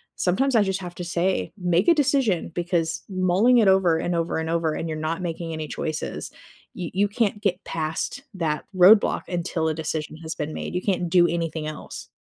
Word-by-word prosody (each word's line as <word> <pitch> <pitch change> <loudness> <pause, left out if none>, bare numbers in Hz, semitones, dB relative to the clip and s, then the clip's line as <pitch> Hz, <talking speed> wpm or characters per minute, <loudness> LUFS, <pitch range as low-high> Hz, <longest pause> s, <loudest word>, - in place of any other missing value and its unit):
sometimes 250 +9 +1
I 220 - +6
just 190 -1 -2
have 175 -1 -7
to 180 - -5
say, 175 +2 -1
"Make 180 0 +1
a 340 - +8
decision," 265 - +1
because 170 -2 -1
mulling 190 +6 +3
it 210 - +4
over, 190 -4 +4
and 175 - -1
over, 165 -1 -1
and 160 0 -2
over, 165 -2 0
and 165 - -3
you're 155 - -3
not 165 +3 -2
making 165 -1 -4
any 155 -1 -4
choices, 155 +1 -4 0.5
you 175 -3 -5
you 200 +2 +2
can't 205 -1 -1
get 190 -3 -1
past 160 - -3
that 160 -4 -2
roadblock 190 +4 +6
until 170 -2 -2
a 160 - +1
decision 155 0 -4
has 160 0 -6
been 150 +1 -4
made. - - -5
You 180 - 0
can't 180 -4 0
do 175 -1 +5
anything 165 -2 -2
else. 155 - -7
175 Hz, 200 wpm, -24 LUFS, 160-190 Hz, 0.5 s, a